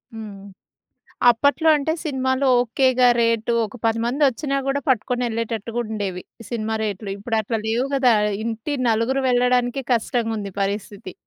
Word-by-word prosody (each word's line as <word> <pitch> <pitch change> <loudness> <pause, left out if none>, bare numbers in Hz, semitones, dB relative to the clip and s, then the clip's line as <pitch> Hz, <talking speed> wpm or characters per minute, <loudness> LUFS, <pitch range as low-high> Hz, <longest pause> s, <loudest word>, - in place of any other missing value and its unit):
హ్మ్. 210 -3 -8 0.9
అప్పట్లో 285 +7 +2
అంటే, 315 +3 -1
సినిమాలో 265 -2 0
ఓకేగా 250 +1 +3
రేటు 230 0 +1
ఒక 215 +4 -10
10 225 0 +1
మందొచ్చినా 275 +2 +1
కూడా, 275 +1 +1
పట్టుకొని 250 0 +1
వెళ్ళేటట్టుగా 230 0 -3
ఉండేవి. 200 -4 -4 0.3
సినిమా 220 -2 -2
రేట్లు. 205 -1 -4
ఇప్పుడట్లా 220 +1 -2
లేవు 235 +4 0
కదా! 255 -3 +4 0.3
ఇంటి 230 +5 -3 0.2
నలుగురు 230 +5 +1
వెళ్ళడానికే 250 +1 +1
కష్టంగుంది 225 -4 -1
పరిస్థితి. 200 -1 -4
230 Hz, 120 wpm, -22 LUFS, 220-260 Hz, 0.9 s, కదా